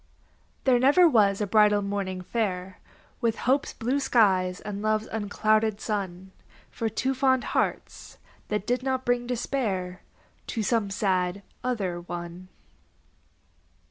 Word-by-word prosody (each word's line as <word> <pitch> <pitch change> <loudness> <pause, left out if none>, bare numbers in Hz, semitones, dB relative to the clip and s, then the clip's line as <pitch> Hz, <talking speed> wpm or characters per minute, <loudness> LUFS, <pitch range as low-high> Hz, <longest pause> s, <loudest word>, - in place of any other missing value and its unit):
There 255 -2 +4
never 290 +8 +6
was 210 -8 +3
a - - +1
bridal 210 0 +4
morning 195 -2 -3
fair 185 -3 -3 0.4
With 230 -2 +1
hope's 270 +3 +2
blue 255 +5 -1
skies 190 -8 +2
and 205 -1 -6
love's 215 0 +1
unclouded 215 0 0
sun 190 -4 -4 0.4
For 225 - -2
two 260 +5 -1
fond 260 -1 +2
hearts, - - -2 0.3
that 210 -1 -2
did 245 0 0
not 260 0 -2
bring 245 0 0
despair 210 -7 -2 0.5
To 225 - -2
some 215 -1 +1
sad 190 -1 0 0.2
other 195 -9 -2
one. 175 +1 -7
210 Hz, 125 wpm, -26 LUFS, 190-245 Hz, 0.5 s, never